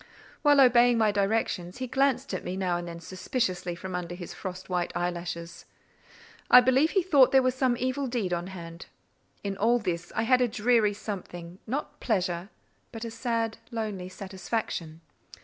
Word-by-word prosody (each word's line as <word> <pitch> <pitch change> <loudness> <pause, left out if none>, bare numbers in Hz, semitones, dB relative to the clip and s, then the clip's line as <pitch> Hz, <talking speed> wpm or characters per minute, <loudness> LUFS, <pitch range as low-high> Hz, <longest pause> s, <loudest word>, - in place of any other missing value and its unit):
While 290 -2 +5
obeying 245 -2 +6
my 220 -2 +3
directions, 200 -3 -1
he 255 - -3
glanced 265 -1 +1
at 185 - -3
me 185 +1 -4
now 185 -2 0
and 175 0 -4
then 170 0 -7
suspiciously 185 0 -2
from 185 +2 -7
under 175 -1 -4
his 175 -1 -8
frost 185 -1 -7
white 180 -2 -1
eyelashes. 170 -1 -4 0.8
I 250 - +10
believe 260 +5 +4
he 385 0 +2
thought 285 -8 +5
there 265 -1 +5
was 255 0 +2
some 255 -2 +1
evil 260 +3 -1
deed 230 -7 -1
on 175 +1 -2
hand. 170 -2 -9 0.6
In 200 -1 -2
all 230 +5 +3
this 175 -6 -3
I 220 - +1
had 255 +2 +4
a 250 - +4
dreary 215 -1 +2
something—not 200 - -6
pleasure—but 195 +3 -4
a 230 - -5
sad, 230 -1 -2
lonely 210 -6 -4
satisfaction. 185 -4 -4
205 Hz, 165 wpm, -28 LUFS, 180-245 Hz, 0.8 s, I